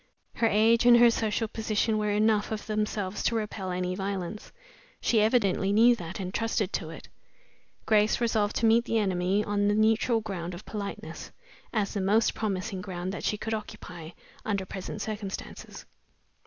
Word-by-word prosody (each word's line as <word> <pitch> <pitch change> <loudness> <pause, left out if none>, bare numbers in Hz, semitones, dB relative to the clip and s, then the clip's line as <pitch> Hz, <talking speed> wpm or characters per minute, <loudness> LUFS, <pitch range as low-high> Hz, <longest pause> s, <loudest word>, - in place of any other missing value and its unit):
Her 230 - +3
age 230 +3 +4
and 240 -1 +8
her 235 0 +7
social 225 0 -1
position 215 0 0
were 210 0 0
enough 210 +1 +2
of 215 -1 -4
themselves 210 -2 -2
to 235 - 0
repel 210 -3 -3
any 180 0 -2
violence. 195 +1 -4 0.5
She 225 -3 +2
evidently 205 -4 +2
knew 235 +4 +6
that, 180 -2 -7
and 185 -1 -5
trusted 225 -3 -1
to 160 - -3
it. 165 - -10 0.8
Grace 215 -1 +3
resolved 220 -3 +1
to 230 - +1
meet 230 +1 +4
the 230 - 0
enemy 190 0 +1
on 205 -1 0
the 205 - +2
neutral 220 +2 +3
ground 180 -5 -5
of 180 - -11
politeness, 205 -2 -6 0.4
as 210 -3 -1
the 200 - -2
most 210 +4 +3
promising 195 -2 -3
ground 180 -1 -5
that - - -6
she 210 - 0
could 225 +1 -4
occupy 180 -6 -7 0.3
under 200 -3 -2
present 185 0 -6
circumstances. 205 -3 -7
210 Hz, 170 wpm, -28 LUFS, 190-220 Hz, 0.8 s, and